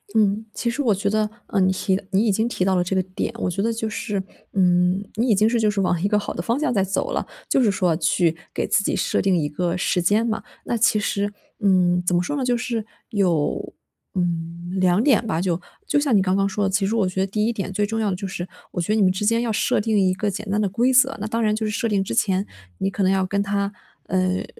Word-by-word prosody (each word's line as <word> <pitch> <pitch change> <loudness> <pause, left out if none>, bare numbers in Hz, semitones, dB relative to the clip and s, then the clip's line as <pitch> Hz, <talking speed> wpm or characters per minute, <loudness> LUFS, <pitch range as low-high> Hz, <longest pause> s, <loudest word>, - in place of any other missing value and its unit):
嗯， 215 0 +2
其 235 - -2
实 235 +5 -2
我 235 -6 +3
觉 200 +1 -1
得， 215 +1 +1 0.2
呃， 200 - 0
你 185 0 +4
提 190 0 0
你 200 +3 +3
已 - - +4
经 220 +4 +1
提 225 -6 -1
到 190 0 +2
了 180 - +2
这 185 +2 -2
个 190 - +3
点， 185 0 -4
我 - - 0
觉 180 +3 -2
得 230 +1 +1
就 225 -1 -3
是 210 -2 -3 0.3
嗯， 180 0 +3
你 230 +4 +1
已 - - +6
经 210 +3 +3
是 235 0 +1
就 215 -2 +2
是 205 -1 -1
往 180 -3 +1
一 - - +3
个 210 0 +2
好 205 - -4
的 - - -3
方 235 +9 -1
向 305 -3 0
在 200 -5 +2
走 195 +1 -1
了， - - -1 0.2
就 265 - +3
是 215 - +4
说 180 -4 +1
去 165 +1 +1 0.2
给 - - -1
自 200 - +2
己 - - 0
设 - - 0
定 190 -1 +2
一 150 -3 0
个 170 +3 -1
时 180 0 0
间 205 +6 +2
嘛。 220 -2 -2 0.2
那 235 - -1
其 215 -1 +3
实， 205 0 -1 0.3
嗯， 180 -4 +3
怎 180 - +2
么 175 - +3
说 235 +11 -3
呢， 270 -3 -1
就 245 -1 +2
是 235 -2 -3 0.2
有， 175 -8 0 0.4
嗯， 170 0 -3
2 185 +1 +3
点 255 -5 +3
吧， 180 -6 -1
就 175 -2 0 0.3
就 295 - +2
像 285 -5 +2
你 200 - +5
刚 185 0 +1
刚 195 0 +2
说 200 +1 -1
的， - - +1
其 195 +1 +1
实 210 +4 0
我 210 -5 +2
觉 185 +1 -3
得 - - +2
第 210 +2 -1
1 235 - 0
点 195 -3 -4
最 210 - 0
重 225 +2 -2
要 210 -2 +1
的 - - -1
就 195 +2 -5
是 180 -1 -5 0.2
我 175 - -2
觉 170 - -5
得 - - +2
你 220 - +2
们 185 -2 +5
之 190 +3 -2
间 230 +2 +3
要 235 -2 -1
设 225 +3 +1
定 220 0 +1
一 185 -1 +3
个 205 +3 -1
简 205 +2 -5
单 210 +1 +1
的 205 - +1
规 240 +7 +2
则， 260 +1 +4
那 205 - -3
当 230 +2 -1
然 215 -1 +2
就 220 0 -2
是 215 - -1
设 230 - -1
定 200 -3 +1
之 190 - -4
前 190 - +1 0.3
你 195 - -1
可 200 - -4
能 190 0 +3
要 190 -1 +2
跟 200 +2 0
他， 200 0 -1 0.4
呃， 185 0 0
200 Hz, 300 characters per minute, -22 LUFS, 185-220 Hz, 0.4 s, 已